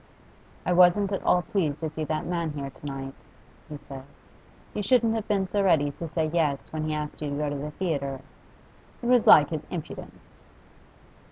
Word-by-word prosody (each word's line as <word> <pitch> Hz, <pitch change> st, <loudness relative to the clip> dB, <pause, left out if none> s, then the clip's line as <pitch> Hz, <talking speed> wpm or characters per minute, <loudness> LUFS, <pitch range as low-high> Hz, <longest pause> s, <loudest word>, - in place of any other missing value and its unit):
'I 180 Hz, -, +2 dB
wasn't 180 Hz, +3 st, +5 dB
at 195 Hz, -, -1 dB
all 180 Hz, -, +3 dB
pleased 160 Hz, -9 st, -1 dB
to 160 Hz, -, -1 dB
see 155 Hz, 0 st, -4 dB
that 155 Hz, 0 st, -2 dB
man 170 Hz, -3 st, -2 dB
here 140 Hz, -2 st, -5 dB
to 145 Hz, -, -15 dB
night,' 135 Hz, -1 st, -5 dB, 0.6 s
he 150 Hz, -, -6 dB
said. 135 Hz, -2 st, -10 dB, 0.7 s
'You 210 Hz, -, -2 dB
shouldn't 230 Hz, +1 st, +3 dB
have 220 Hz, -2 st, -3 dB
been 200 Hz, -3 st, +1 dB
so 200 Hz, +2 st, 0 dB
ready 155 Hz, -7 st, +3 dB
to 165 Hz, +4 st, -7 dB
say 160 Hz, 0 st, -1 dB
yes 150 Hz, -5 st, 0 dB
when 155 Hz, -1 st, -2 dB
he 155 Hz, -, -1 dB
asked 150 Hz, 0 st, -5 dB
you 150 Hz, -, -2 dB
to 140 Hz, -, -3 dB
go 150 Hz, -1 st, -1 dB
to -, -, -3 dB
the 145 Hz, +2 st, -4 dB
theatre. 140 Hz, -5 st, -3 dB, 0.8 s
It -, -, -4 dB
was 245 Hz, -2 st, +4 dB
like 150 Hz, +1 st, +8 dB
his 155 Hz, -2 st, -4 dB
impudence! 170 Hz, -4 st, -8 dB
155 Hz, 195 wpm, -26 LUFS, 145-185 Hz, 0.8 s, like